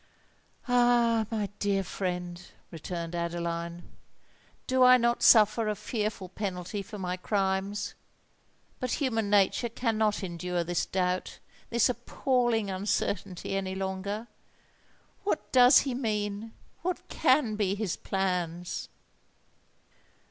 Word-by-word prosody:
"Ah! 240 -2 +3
my 215 -3 -1
dear 200 -1 +1
friend," 180 -1 -4 0.2
returned 170 0 -5
Adeline; 170 0 -3 0.8
"do 260 0 +1
I 255 0 +8
not 235 0 +1
suffer 220 -1 +6
a 210 - 0
fearful 210 -2 -3
penalty 190 0 -4
for 210 +2 -9
my 180 -2 -2
crimes? 195 +1 -1 0.9
But 255 -1 -2
human 225 -7 0
nature 205 +4 +3
cannot 220 -3 0
endure 175 -1 -2
this 175 0 -1
doubt—this 185 +5 -1
appalling 240 -3 0
uncertainty 195 -1 -2
any 190 -1 -2
longer! 195 +3 -3 1.0
What 400 -5 -2
does 250 +1 +7
he 270 -2 -2
mean? 215 -2 -2 0.3
what 360 +1 -3
can 255 -5 +2
be 200 -2 0
his 205 -4 -2
plans?" 180 -3 -2
205 Hz, 105 wpm, -29 LUFS, 180-230 Hz, 1.0 s, I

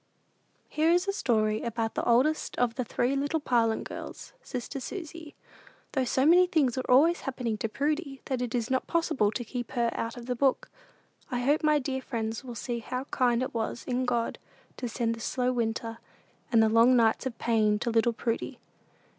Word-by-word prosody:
Here 315 +2 +1
is 355 +3 +3
a 395 - +1
story 215 - +1
about 230 -1 -2
the - - -2
oldest 260 +7 +2
of 245 -2 +2
the 255 - -2
three 245 +3 0
little 285 +3 0
Parlin 230 -6 +1
girls, - - -8
"sister 250 +2 -5
Susy;" 325 0 -7 0.6
though 265 -3 0
so 260 +2 +1
many 355 +3 +6
things 290 -8 +2
are 260 - -4
always 320 +7 +5
happening 250 -4 -3
to 225 - -2
Prudy 290 +2 -2
that 260 -2 -2
it 245 -1 -2
is 235 0 -1
not 260 - 0
possible 325 -11 +1
to 240 +2 -4
keep 245 +1 -5
her 235 -2 +1
out 230 +2 -4
of 240 - -8
the 250 0 -2
book. 265 +2 +1 0.6
I 245 -1 -2
hope 285 +5 +2
my 305 -1 +4
dear 265 -1 -2
little 260 - -9
friends 225 0 -3
will 245 -2 -8
see 235 +2 -3
how 250 +3 -4
kind 245 -1 +2
it 260 - -4
was 230 +1 -3
in 255 0 -1
God 235 -2 -1 0.4
to 245 - -4
send 230 0 -1
the 230 - -8
"slow 250 +2 0
winter" 230 -1 -2 0.5
and 225 -2 +5
the - - +4
long 230 +3 +5
nights 230 +2 +3
of 235 -3 -6
pain 215 -3 +2
to 235 +2 -2
little 230 +1 +3
Prudy. 230 0 -3
245 Hz, 200 wpm, -28 LUFS, 230-275 Hz, 0.6 s, many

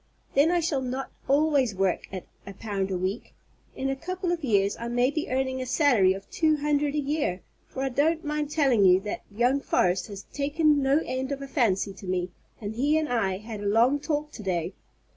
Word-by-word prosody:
Then 285 +4 +4
I 350 0 +2
shall 305 -4 0
not 260 +1 -4 0.2
always 280 -5 +2
work 190 -1 0
at 185 -2 -6 0.2
a 200 - -8
pound 200 -2 -3
a 185 - -1
week. 190 +5 -4 0.4
In 270 - -2
a 270 - 0
couple 365 +5 -3
of 340 -2 -2
years 200 -5 +2
I 235 - -4
may 245 +2 +2
be 310 0 -3
earning 260 0 -1
a 255 - -4
salary 240 - +4
of 195 0 -9
two 310 -2 +2
hundred 290 0 0
a - - +1
year, 280 - -1 0.3
for 265 - -5
I 270 - 0
don't 315 +5 +1
mind 300 0 -2
telling 270 -9 +3
you 185 -1 +6
that 210 +1 -4
young 245 +6 +1
Forrest 180 -8 +1
has 200 -2 -8
taken 295 +1 +2
no 275 +3 +3
end 260 +1 -3
of 280 - -2
a - - -6
fancy 205 -8 +1
to 190 0 -11
me, 180 -1 -1 0.3
and 210 -1 -5
he 285 +7 +2
and 315 -1 -1
I 200 -6 0
had 215 0 -7
a 205 - -2
long 235 +7 +3
talk 300 0 -2
to 225 - -9
day. 180 -2 -2
260 Hz, 220 wpm, -26 LUFS, 200-295 Hz, 0.4 s, you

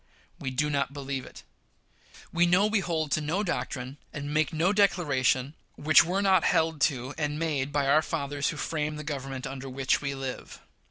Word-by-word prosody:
We 135 - -3
do 150 +3 0
not 140 -1 0
believe 135 -2 -4
it. - - -13 0.9
We 175 0 +4
know 180 +4 +4
we 215 0 +2
hold 160 -5 -2
to 155 - +2
no 165 +7 -1
doctrine, 135 -7 -3
and 145 0 -5
make 155 +1 +2
no 170 +5 +1
declaration, 150 -9 +2 0.2
which 155 +1 +6
were 185 +4 -1
not 190 -3 +4
held 160 -3 +1
to 130 -1 -6
and 150 -1 -1
made 145 -4 -1
by 145 -1 +1
our 145 +3 +5
fathers 145 -3 -2
who 155 - -5
framed 150 0 -2
the 150 - -6
Government 135 -3 -5
under 135 0 -6
which 135 0 0
we 140 -1 -3
live. 135 -1 -6
150 Hz, 185 wpm, -28 LUFS, 135-165 Hz, 0.9 s, which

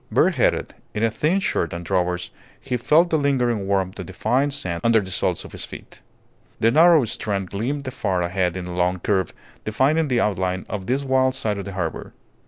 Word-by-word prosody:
Bareheaded, - - +2 0.2
in 105 - -1
a 115 - +3
thin 155 - +1
shirt 85 - -1
and 85 0 -6
drawers, 90 -1 -1 0.3
he 130 -2 -3
felt 155 +8 +3
the 160 - +3
lingering 125 -8 +1
warmth 95 -1 0
of 95 - -6
the 95 - -9
fine 130 +10 +1
sand 90 -12 -3
under 115 -1 +5
the 95 -3 -6
soles - - -1
of - - -11
his - - -5
feet. - - -10 0.6
The 115 - +4
narrow 160 -1 +6
strand 100 -4 -3
gleamed 130 +6 -3
far 95 -8 -1
ahead 90 0 -1
in 90 - -5
a 90 - -6
long 90 +1 +1
curve, 95 -1 0 0.3
defining 145 +9 +2
the 125 -3 +1
outline 95 -3 -1
of 100 -3 -5
this 135 +3 0
wild 130 -1 +2
side 105 -6 -1
of 100 - -5
the 100 - -6
harbour. 90 -4 -4
105 Hz, 200 wpm, -22 LUFS, 95-130 Hz, 0.6 s, narrow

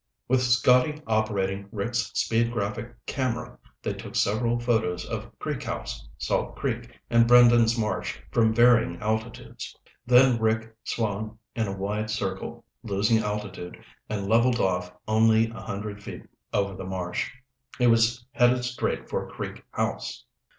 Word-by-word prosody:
With 130 +1 +3
Scotty 125 +4 +4
operating 100 -3 0
Rick's 115 +2 -1
speed 115 +1 +2
graphic 110 +1 -3
camera, 130 -4 -3 0.2
they - - -1
took - - -9
several 115 +3 +1
photos 110 -7 0
of - - -6
Creek - - -3
House, - - -5
Salt - - -1
Creek, - - -4
and 115 0 +5
Brendan's 120 -1 +6
Marsh 110 -2 -2
from 110 -1 +4
varying 120 +1 +4
altitudes. 115 +2 -4 0.3
Then 125 -1 +6
Rick 110 0 0
swung 110 -1 -2 0.2
in 110 -2 0
a 100 0 -4
wide 105 +3 -2
circle, 95 -3 -4 0.2
losing 105 +2 +2
altitude, 105 -4 -4 0.3
and 100 -2 -2
leveled 120 +3 +3
off 90 -1 0 0.2
only 110 +1 +4
a 115 - -9
hundred 100 +1 -5
feet - - -8 0.3
over 100 0 0
the 95 - -7
marsh. 90 -2 -3 0.5
He 125 - +2
was 115 +1 +3
headed 125 -2 +3
straight 125 0 -2
for - - -3
Creek - - -7
House. - - -3
110 Hz, 140 wpm, -26 LUFS, 100-120 Hz, 0.5 s, Brendan's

